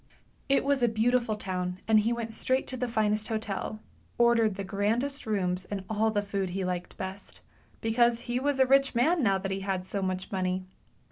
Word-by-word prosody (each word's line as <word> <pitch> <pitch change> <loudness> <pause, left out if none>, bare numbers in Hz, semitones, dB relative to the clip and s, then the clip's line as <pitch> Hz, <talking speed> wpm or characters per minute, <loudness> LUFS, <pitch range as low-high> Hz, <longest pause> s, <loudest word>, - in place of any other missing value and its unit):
It 275 0 +3
was 280 -2 +2
a 240 - +4
beautiful 230 0 +1
town, 180 -3 -3
and 220 -1 +6
he 220 +3 +1
went 230 -1 -3
straight 260 +4 +1
to 260 - -3
the 250 0 -2
finest 215 -2 +1
hotel, 215 -1 -3 0.4
ordered 235 -3 +4
the 200 - -4
grandest 225 +8 -1
rooms 185 -3 0
and 195 -1 -5
all 220 +1 +2
the 205 -1 0
food 200 -2 -2
he 190 +1 -2
liked 180 -1 -4
best, 190 +1 -7 0.4
because 235 +1 +2
he 240 +1 -2
was 280 0 0
a 265 - +6
rich 275 0 +3
man 315 +8 +3
now 195 -6 +3
that 195 0 -4
he 190 - -2
had 190 -1 -2
so 200 +1 -3
much 185 -1 -3
money. 185 -1 -1
215 Hz, 200 wpm, -28 LUFS, 195-240 Hz, 0.4 s, and